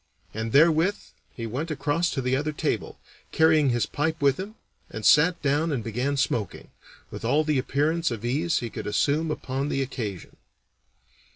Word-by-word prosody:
And 110 +1 -4
therewith 165 - +4 0.4
he 115 - -5
went 130 +9 -4
across 155 +3 0
to 135 - -3
the 125 +1 +1
other 150 +3 -1
table, 150 - -3 0.3
carrying 160 -3 +4
his 120 -1 +1
pipe 160 +2 -2
with 140 +1 +2
him, 205 +3 -6 0.3
and 110 -1 -6
sat 170 +4 +5
down 150 +3 +1
and 130 -6 -2
began 125 +6 -2
smoking, 115 -6 -2 0.4
with - - -8
all 145 +7 +2
the 150 -3 +1
appearance 150 +5 0
of 115 -2 -5
ease 155 +7 0
he 120 -2 -5
could - - -6
assume 145 +9 +1
upon 135 -1 -3
the 135 - 0
occasion. 110 -9 -6
145 Hz, 170 wpm, -25 LUFS, 125-160 Hz, 0.4 s, sat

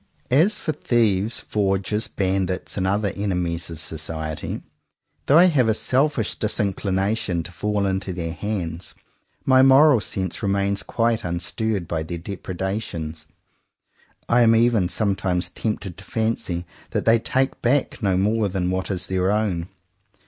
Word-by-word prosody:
As 175 +11 +4
for 155 - -2
thieves, 115 -6 +1
forgers, 100 +1 0
bandits, 95 -1 -1
and 95 -2 0
other 100 0 0
enemies 90 -4 -2
of 85 -2 -8
society, 80 0 -5 0.6
though 145 - +6
I 175 - +8
have 145 -10 +3
a 110 - +3
selfish 130 -2 +1
disinclination 100 -2 -1
to 90 - -7
fall 105 +3 -1
into 95 0 -1
their 85 -2 -4
hands, 90 -5 -4 0.5
my 130 -1 +6
moral 135 0 +7
sense 95 -4 -3
remains 100 0 +1
quite 115 -1 0
unstirred 90 +2 -2
by 80 -2 -2
their 85 +2 -5
depredations. 90 -3 -5 1.0
I 120 +1 +4
am 115 -1 +6
even 115 -5 +3
sometimes 95 -4 0
tempted 100 -3 -4
to - - -10
fancy 110 -6 -1 0.2
that - - -2
they 115 +1 +5
take 130 +3 -1
back 130 +2 +1
no 95 -3 +2
more 105 +2 +1
than 90 -1 -1
what 95 0 -2
is 95 -3 -1
their 95 0 0
own. 100 -5 -1
100 Hz, 140 wpm, -23 LUFS, 90-115 Hz, 1.0 s, I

